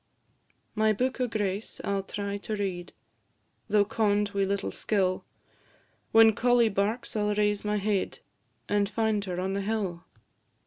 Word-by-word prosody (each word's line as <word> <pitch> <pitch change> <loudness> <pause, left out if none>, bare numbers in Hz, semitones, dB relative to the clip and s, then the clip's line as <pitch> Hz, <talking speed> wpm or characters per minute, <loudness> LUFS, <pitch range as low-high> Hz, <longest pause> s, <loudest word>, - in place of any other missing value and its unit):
My 215 0 +3
book 255 +4 -1
o' 250 - +2
grace 205 -2 -3
I - - -2
'll 195 - 0
try 200 +1 -4
to 215 +2 -4
read, 185 -4 -3 0.8
Though 205 0 +4
conn'd 210 -1 +1
wi' 200 -1 +1
little 200 +1 -2
skill; 190 -3 0 0.9
When 225 0 +7
collie 240 +1 +3
barks 210 +5 -1
I 215 - +1
'll 210 0 +1
raise 210 -1 +1
my 210 0 0
head, 200 -1 -1 0.5
And 205 -1 +1
find 220 -2 0
her 180 -2 -3
on 190 +1 -1
the 200 - -1
hill. 195 -5 -2
205 Hz, 160 wpm, -28 LUFS, 195-220 Hz, 0.9 s, When